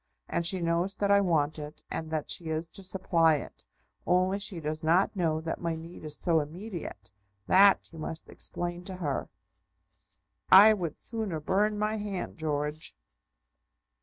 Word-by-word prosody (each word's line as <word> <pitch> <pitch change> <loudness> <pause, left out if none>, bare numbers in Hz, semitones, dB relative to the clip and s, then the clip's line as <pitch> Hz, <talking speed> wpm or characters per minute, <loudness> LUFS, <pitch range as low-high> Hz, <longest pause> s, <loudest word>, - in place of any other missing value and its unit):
And 170 - -1
she 185 0 +2
knows 170 +3 0
that 200 -1 0
I 200 0 +6
want 155 -5 +1
it, 150 +1 -9
and 160 - -4
that 155 -2 -2
she 170 - +1
is 160 +1 -3
to - - -5
supply 170 -4 +2
it; 145 - -7 0.4
only 185 +2 +2
she 200 -3 -1
does 155 0 -4
not 175 +6 +3
know 165 -4 0
that 165 0 -4
my 170 -1 -1
need 165 +1 -10
is 150 -1 -2
so 165 -3 +2
immediate. 160 - -7 0.3
That 195 - +5
you 160 - -10
must 160 +1 -6
explain 175 0 -4
to 190 - -6
her." 150 -7 -3 1.2
"I 205 +3 +10
would 175 -7 -4
sooner 220 -8 -2
burn 205 +7 +1
my 215 +1 -1
hand, 205 -5 -5
George!" 150 - -2
170 Hz, 165 wpm, -29 LUFS, 155-190 Hz, 1.2 s, I